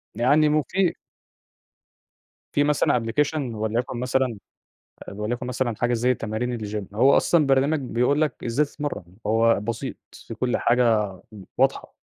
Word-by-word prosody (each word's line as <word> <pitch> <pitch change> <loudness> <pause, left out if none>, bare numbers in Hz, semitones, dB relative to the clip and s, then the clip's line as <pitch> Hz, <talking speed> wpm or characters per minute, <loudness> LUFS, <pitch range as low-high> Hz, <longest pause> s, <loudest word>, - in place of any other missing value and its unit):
يعني 145 +7 +3
مُفي 170 +5 +1 1.6
فيه 145 - +3
مثلًا 145 -4 +2
application 145 +7 0 0.2
ولَيُكن 115 +3 -2
مثلًا 125 -2 0 0.7
آآ - - -7
وليَكُن 120 +5 -4
مثلًا 125 -2 -1
حاجة 120 +2 0
زي 125 +2 +2
تمارين 120 +2 -3
الgym. 105 -2 -6
هو 130 +6 +5
أصلًا 165 -4 +3
برنامج 135 +3 +2
بيقول 130 +3 0
لك 150 -4 +1
إزاي 120 +6 +1
تتمرّن، 140 - -6
هو 115 +1 +3
بسيط، 115 +5 -4 0.3
فيه 115 - -6
كل 125 +3 0
حاجة 125 +1 +2 0.5
آآ 95 - -11
واضحة، - - +1
125 Hz, 140 wpm, -24 LUFS, 115-140 Hz, 1.6 s, هو